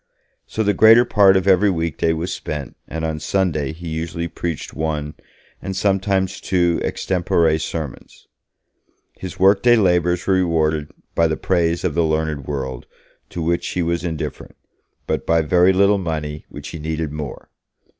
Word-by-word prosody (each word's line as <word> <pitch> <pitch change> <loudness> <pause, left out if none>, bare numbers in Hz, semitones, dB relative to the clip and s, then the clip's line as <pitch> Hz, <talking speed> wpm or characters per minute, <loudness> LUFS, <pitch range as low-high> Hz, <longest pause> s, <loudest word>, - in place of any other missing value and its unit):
So 110 - -2
the 105 -1 +2
greater 110 +5 +7
part 100 -4 +5
of 95 - -1
every 95 +2 +5
weekday 80 -3 0
was 80 +3 -2
spent, 75 -3 -6
and 80 +1 -4
on 80 -1 -3
Sunday 80 -6 0
he 85 +2 -9
usually 85 +1 -3
preached 85 -1 -5
one, 75 -2 -3 0.5
and 95 - -5
sometimes 95 -1 0
two 85 -2 +1
extempore 85 -3 +1
sermons. 80 -4 -6 0.9
His 95 -2 -8
workday 100 +6 +5
labours 90 -4 +2
were 95 - +2
rewarded 80 -4 +1 0.2
by 85 - +3
the 80 -1 -2
praise 85 -2 0
of 90 -4 0
the 85 - +2
learned 80 -3 -1
world, 65 -3 -4 0.4
to 85 - -4
which 85 +1 0
he 90 - -1
was 85 +1 -1
indifferent, 80 -3 -5 0.5
but - - -2
by 85 0 +3
very 90 +4 +4
little 100 +2 +3
money, 75 -4 -4
which 70 0 -9
he 85 - -7
needed 80 0 -3
more. 75 -2 -7
85 Hz, 155 wpm, -20 LUFS, 80-95 Hz, 0.9 s, greater